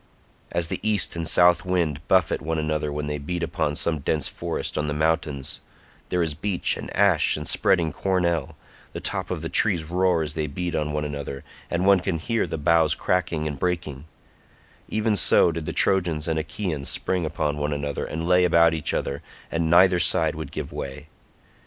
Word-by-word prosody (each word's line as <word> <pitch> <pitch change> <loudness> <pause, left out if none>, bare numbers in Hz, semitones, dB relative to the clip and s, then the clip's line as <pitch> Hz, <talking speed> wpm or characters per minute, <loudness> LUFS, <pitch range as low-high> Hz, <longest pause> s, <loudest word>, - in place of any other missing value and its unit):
As 85 -1 0
the - - -3
east 105 -5 +1
and 85 -1 -3
south 90 0 +5
wind 85 -6 -1
buffet 90 -3 +2
one 80 +1 -2
another 75 -1 -1
when 75 0 -3
they 75 0 -3
beat 85 +4 -4
upon 80 -3 -1
some 80 0 -1
dense 75 +2 -1
forest - - -4
on 75 - -1
the 75 - -2
mountains—there 80 +2 -3
is 80 -2 -2
beech 95 +4 0
and - - -7
ash 100 -8 +4
and 75 -1 -6
spreading 80 0 +2
cornel; 85 -6 -1 0.4
the - - -5
top - - -1
of - - -4
the - - -2
trees 85 - +2
roar 90 0 +1
as 75 -1 -4
they 75 -1 -2
beat 85 +4 -4
on 75 -1 -1
one 75 0 -2
another, 70 -2 -6 0.3
and 85 +2 -1
one 100 -1 +6
can 90 -2 -2
hear 115 +5 -1
the 80 0 -4
boughs 80 0 +3
cracking 90 -4 -1
and 75 -2 -4
breaking—even 90 - -5
so 90 - +5
did 80 -1 -5
the - - -1
Trojans 85 -5 +1
and 80 -1 0
Achaeans 80 -3 -4
spring 90 -2 -1
upon 75 -1 -2
one 75 0 -2
another 70 -1 -3
and 80 +2 -4
lay 90 0 +4
about 85 -2 +4
each 80 -2 -2
other, 70 +1 -3 0.3
and 80 -1 0
neither 90 +1 +5
side 80 -2 +2
would 80 0 -7
give - - -5
way. 75 +3 -7
80 Hz, 190 wpm, -24 LUFS, 75-90 Hz, 0.4 s, one